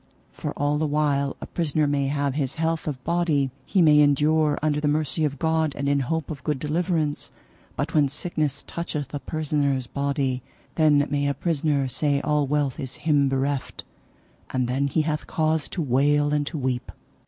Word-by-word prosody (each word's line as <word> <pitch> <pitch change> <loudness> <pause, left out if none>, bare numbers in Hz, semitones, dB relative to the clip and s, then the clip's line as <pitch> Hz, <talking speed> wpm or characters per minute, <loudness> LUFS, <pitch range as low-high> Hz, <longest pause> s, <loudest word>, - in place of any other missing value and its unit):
For - - -5
all 145 +1 +1
the 155 - +1
while 145 -2 +1
a - - -4
prisoner 155 -2 0
may 140 -1 +1
have 140 -1 0
his 135 -2 -2
health 160 0 -1
of 130 -4 -4
body 160 -5 +1 0.2
he 190 -4 +3
may 150 -2 +6
endure 150 +1 +3
under 150 -1 0
the 150 - +1
mercy 155 +1 0
of 140 -1 -2
God 160 -1 +1
and 140 - -2
in 140 0 +3
hope 160 +4 -2
of 140 -4 -7
good 150 -2 0
deliverance; 155 0 -1 0.4
but 145 +3 -3
when 150 -3 +4
sickness 150 -1 -2
toucheth 150 -5 -4
a 145 - -2
prisoner's 140 -3 -1
body, 140 -1 -1 0.3
then 150 -3 +4
may 145 0 +1
a 140 - 0
prisoner 145 -3 0
say 140 +2 +1
all 150 -1 +1
wealth 145 -2 0
is 130 -1 -4
him 145 -3 +3
bereft, 135 +1 -2 0.7
and 130 -2 0
then 135 +3 0
he 155 +3 +1
hath 150 -1 -2
cause 155 -1 0
to 175 - -2
wail 145 +3 +2
and 145 -1 0
to 160 - -4
weep. 130 -2 -2
145 Hz, 185 wpm, -24 LUFS, 140-155 Hz, 0.7 s, may